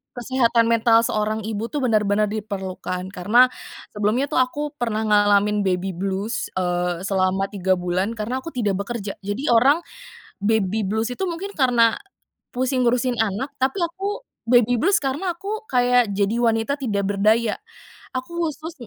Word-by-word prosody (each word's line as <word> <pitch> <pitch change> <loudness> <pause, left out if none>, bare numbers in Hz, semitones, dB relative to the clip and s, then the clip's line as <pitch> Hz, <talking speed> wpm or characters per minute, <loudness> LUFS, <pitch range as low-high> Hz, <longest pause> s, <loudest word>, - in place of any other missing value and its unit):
kesehatan 235 -2 +2
mental 230 0 +4
seorang 215 -1 -1
ibu 220 +1 -3
tuh, 290 -1 -3
benar-benar 215 -3 +2
diperlukan. 190 -3 -5
Karena, 235 +7 +4 0.4
sebelumnya 215 +6 +1
tuh, - - +2
aku 255 +3 -2
pernah 230 -5 -2
ngalamin 205 0 +3
baby 190 0 0
blues, 195 +5 -3
eee, 180 -1 -1
selama 190 0 +1
3 190 -1 +1
bulan, 180 +5 -1
karena 240 +5 -3
aku 330 - -7
tidak 210 - -1
bekerja. 205 -2 -5
Jadi, 205 +8 -4
orang 270 +7 +5 0.7
baby 215 -1 +1
blues 220 +4 -1
itu 385 - -4
mungkin, 385 +4 -6
karena, 240 -4 +3 0.6
pusing 255 0 0
ngurusin 245 0 +1
anak, 225 +7 -2
tapi 265 +9 +1
aku 385 +7 -3 0.3
baby 245 -1 +4
blues 390 +4 +4
karena 290 +8 -1
aku, 430 +4 -5
kayak, 245 -3 +3
jadi 200 +3 0
wanita 225 +3 +1
tidak 205 -6 -1
berdaya, 215 +2 +2 0.6
aku 335 +7 -2
khusus 315 +3 -8
225 Hz, 145 wpm, -22 LUFS, 200-255 Hz, 0.7 s, orang